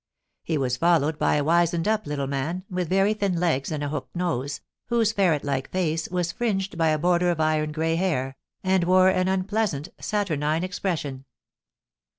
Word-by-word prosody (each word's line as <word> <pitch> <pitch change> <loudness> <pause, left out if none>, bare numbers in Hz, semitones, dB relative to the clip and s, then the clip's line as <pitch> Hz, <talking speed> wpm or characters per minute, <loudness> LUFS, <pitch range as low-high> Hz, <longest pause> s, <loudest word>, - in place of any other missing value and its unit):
He 160 - -1
was 130 -2 0
followed 160 -2 +2
by - - +2
a 145 - +1
wizened 170 +2 +2
up 215 -5 0
little 145 -1 -2
man, 140 +7 -3
with 180 -2 -2
very 195 +3 +3
thin 200 -5 -1
legs 160 -6 0
and 150 -2 -2
a 145 - -2
hooked 145 0 -5
nose, 145 -6 -2 0.3
whose 230 -3 +2
ferret 180 -9 +2
like 135 -2 -2
face 165 -3 -1
was 180 -1 -1
fringed 195 -4 -2
by 165 -1 +2
a 155 - +2
border 175 +2 +2
of 170 -2 0
iron 155 -1 +1
grey 165 +1 0
hair, 135 -8 -1 0.3
and 185 -1 +2
wore 185 +1 +5
an 185 -1 +1
unpleasant, 190 -4 -1
saturnine 160 -6 -1
expression. 165 -8 -3
170 Hz, 175 wpm, -25 LUFS, 150-185 Hz, 0.3 s, wore